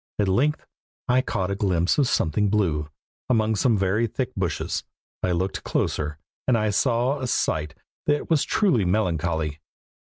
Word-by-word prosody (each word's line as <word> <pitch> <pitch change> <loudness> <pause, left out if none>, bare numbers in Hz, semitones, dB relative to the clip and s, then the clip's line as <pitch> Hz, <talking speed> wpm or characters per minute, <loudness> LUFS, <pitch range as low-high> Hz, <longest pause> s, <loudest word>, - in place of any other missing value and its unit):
At 105 - +1
length 135 +11 +1 0.4
I 125 +1 +4
caught 95 -6 -2
a - - 0
glimpse 90 - +1
of 140 - +4
something 105 -1 +1
blue, 80 -8 0 0.4
among 110 -3 +2
some 110 +2 +2
very 100 +4 +1
thick 130 +3 -3
bushes. 90 -6 -2 0.4
I 90 - 0
looked 95 +2 -1
closer, 75 0 -1 0.3
and 125 -3 +4 0.2
saw 125 +5 +1
a 130 - -2
sight 75 - 0 0.3
that 145 0 +1
was 160 -4 +3
truly 175 - +2
melancholy. 85 -5 0
100 Hz, 150 wpm, -24 LUFS, 85-125 Hz, 0.4 s, I